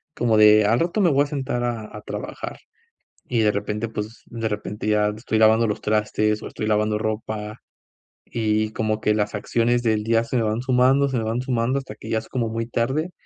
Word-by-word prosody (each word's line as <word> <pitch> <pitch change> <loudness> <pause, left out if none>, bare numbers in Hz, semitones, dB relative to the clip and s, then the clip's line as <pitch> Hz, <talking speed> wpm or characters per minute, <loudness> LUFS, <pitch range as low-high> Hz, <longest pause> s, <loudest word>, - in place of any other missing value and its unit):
como 115 -3 +2
de: 105 0 +7
"Al 115 +3 +3
rato 175 +5 0
me 180 - +5
voy 140 +1 +4
a - - -4
sentar 130 -4 -2
a 115 -3 -4
a 105 - -7
trabajar". - - -6 0.7
Y 120 -2 +1
de 105 -1 +3
repente, 105 +2 -3
pues, 110 +1 -6
de 115 -1 -3
repente 105 0 -5
ya 105 -1 +3
estoy 110 0 -1
lavando 110 +1 +5
los 105 - -2
trastes 105 0 0
o - - -6
estoy 110 - -5
lavando 105 0 +1
ropa, 110 0 -4 0.7
y, 110 -1 0
como 110 -1 -1
que 105 - +2
las 105 0 -1
acciones 120 +3 +1
del 110 -2 +1
día 115 +1 +2
se 125 - -5
me 115 - +2
van 110 +2 -1
sumando, 130 +2 +3
se 130 - -1
me 115 - -1
van 115 +3 -1
sumando 125 +1 0
hasta 130 -6 -9
que 110 - -10
ya 110 - +1
es 110 - -12
como 120 -3 -1
muy 115 +1 -3
tarde, 135 +9 -1
110 Hz, 215 wpm, -23 LUFS, 105-120 Hz, 0.7 s, de